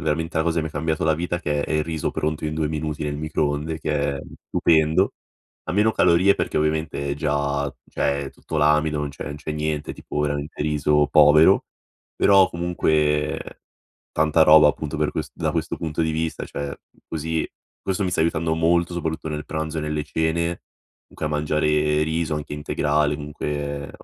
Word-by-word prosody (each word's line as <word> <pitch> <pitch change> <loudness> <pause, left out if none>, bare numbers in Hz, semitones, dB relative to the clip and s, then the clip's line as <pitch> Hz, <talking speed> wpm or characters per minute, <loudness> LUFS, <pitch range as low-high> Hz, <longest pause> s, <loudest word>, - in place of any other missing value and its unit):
veramente 80 +2 -2
la 80 - +1
cosa 85 0 0
che - - +1
mi 80 - -3
ha - - -12
cambiato 80 +1 -2
la 80 -1 +3
vita, 85 +2 -2
che 75 -3 -1
è - - -4
il 75 0 +2
riso 80 -1 -3
pronto 75 0 -2
in 75 - -2
2 80 -1 0
minuti 75 0 -3
nel 75 -1 -2
microonde, 75 +1 -2
che 75 -2 0
è 70 - -5 0.3
stupendo. 80 -1 +2 0.5
Ha 80 - -4
meno 105 +3 +3
calorie 95 +1 +4
perché, - - -2
ovviamente, 75 -2 -1
è - - 0
già 70 -1 -1 0.2
cioè, 70 -1 -1
tutto 80 - -5
l'amido 75 0 +3
non 75 - -2
c'è 70 - -8
non 75 - -5
c'è 75 +1 -7
niente, 75 -1 -2
tipo, 75 - -5
veramente 75 0 -2
riso 75 -1 +2
povero. 75 +1 +6 0.5
Però, 95 -2 +5
comunque, 75 -3 0 0.6
tanta 80 0 +4
roba, 75 -1 +8
appunto, 75 +2 -4
per 75 -1 +1
quest - - -4
da - - -1
questo - - -2
punto 80 0 -2
di 80 - 0
vista, 80 +1 -2
cioè 70 0 -5 0.3
così 80 0 -2 0.3
questo 95 +1 -1
mi 90 - -1
sta 80 - +1
aiutando 80 0 +1
molto, 85 +1 +2
soprattutto 80 -2 -3
nel 75 0 -4
pranzo 80 0 -3
e - - -4
nelle 75 0 -2
cene 80 +3 -1 0.5
comunque - - -5
a - - -1
mangiare 75 0 +1
riso, 80 0 -1
anche 75 -1 -5
integrale, 75 0 0
comunque 75 -1 -4
75 Hz, 180 wpm, -23 LUFS, 75-80 Hz, 0.6 s, roba